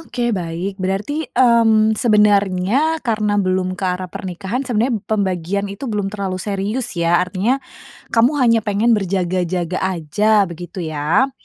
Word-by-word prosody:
oke, 245 - -3
baik. 175 0 -3
Berarti, 205 +12 -2
mmm, 225 -3 +4
sebenarnya 210 - +2
karena 215 -3 0
belum 185 -1 0
ke 195 - -3
arah 180 0 -2
pernikahan 190 +8 -4
sebenarnya 240 0 0
pembagian 200 -2 -1
itu 200 +7 -7
belum 210 -4 -2
terlalu 195 -2 -4
serius 205 +3 -3
ya? 170 +1 +2
Artinya 190 +9 0 0.5
kamu 235 +4 +4
hanya 230 -2 +4
pengen 210 +3 +1
berjaga-jaga 185 -3 -1
aja 190 +4 +2
begitu 175 +2 -7
ya? 160 - +1
200 Hz, 130 wpm, -19 LUFS, 185-225 Hz, 0.5 s, mmm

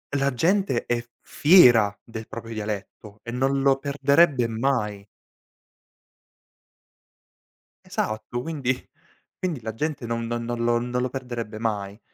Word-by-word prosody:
la 140 0 +2
gente 175 -2 +1
è 120 -1 0
f 120 - -22
fiera 120 - +6
del 110 -1 -9
proprio 115 -1 -7
dialetto 105 0 -6
e 120 - -6
non 135 +2 +1
lo 135 -1 +4
perderebbe 140 -1 +3
mai. 110 -4 -1 2.8
Esatto, 110 +3 -3
quindi 130 -5 -3 0.5
quindi 165 -9 -2
la 110 -1 -5
gente 150 -1 -3
non 115 0 -2
no 120 +1 -2
non 120 0 -3
lo 120 0 +2
non 125 +1 -2
lo 125 - -1
perderebbe 120 -4 -5
mai. 105 -2 -3
120 Hz, 130 wpm, -24 LUFS, 110-135 Hz, 2.8 s, fiera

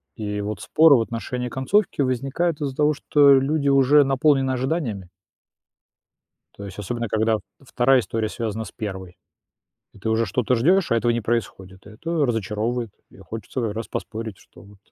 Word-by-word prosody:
И 105 -2 -4
вот 105 +1 -5
споры 160 -2 +5
в 120 - +3
отношении 125 +2 -4
концовки 145 - 0
возникают 135 +5 -1
из-за 140 -3 -3
того, 150 +1 +2
что 145 -1 +4
люди 140 +2 0
уже 140 +2 +5
наполнены 135 0 +2
ожиданиями. 125 - -2 1.5
То 100 - -9
есть, 100 -1 -9
особенно 115 +3 -3
когда 110 +1 +1 0.2
2 130 0 +3
история 110 -1 -3
связана 110 0 -4
с - - -11
1. 95 -5 -7 0.8
Ты 110 - -3
уже 110 +1 +1
что-то 125 +5 0
ждёшь, 175 +10 +2
а - - +3
этого 120 +1 +1
не 120 - -1
происходит, 100 -4 -4
это 150 +8 -2
разочаровывает. 115 +1 -2 0.2
И - - -18
хочется 115 +1 -5
раз 115 +2 -6
поспорить, 110 -3 -6
что 85 - -18
вот 100 +1 -17
120 Hz, 155 wpm, -23 LUFS, 110-135 Hz, 1.5 s, споры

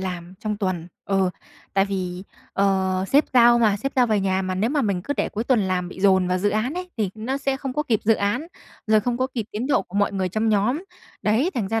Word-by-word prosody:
làm 180 -1 -5
trong 210 -1 -2
tuần, 185 -4 -2 0.2
ừ, 195 -2 +1 0.4
tại 195 - +4
vì, 185 -2 -4 0.3
ờ, 190 -1 +1
sếp 285 +2 +4
giao 240 -1 +7
mà 215 -4 +3
sếp 275 +7 -3
giao 250 -2 +5
về 215 -2 +1
nhà 190 0 0
mà 185 0 -2
nếu 215 +6 0
mà 290 -1 +1
mình 195 -5 -1
cứ 285 - -2
để - - 0
cuối 220 +2 -4
tuần 240 -3 +3
làm 185 -2 -1
bị 185 - -10
dồn 190 -2 +4
vào 180 - +1
dự 205 +3 +1
án 220 +8 -1
ấy, 360 0 -5
thì 210 -5 0
nó 230 +5 -3
sẽ 275 -1 -1
không 270 -1 -5
có 300 - 0
kịp 230 -8 0
dự 225 - +5
án, 215 +9 -1 0.4
rồi 215 0 +4
không 240 +2 -1
có 260 - +1
kịp 230 -4 -2
tiến 225 +5 -3
độ 280 - +2
của 195 - -8
mọi 205 0 +2
người 190 -2 -1
trong 220 +4 0
nhóm. 220 - +1 0.4
Đấy, 230 - +2
thành 210 -6 -1
ra 225 0 0
210 Hz, 260 wpm, -23 LUFS, 190-240 Hz, 0.4 s, giao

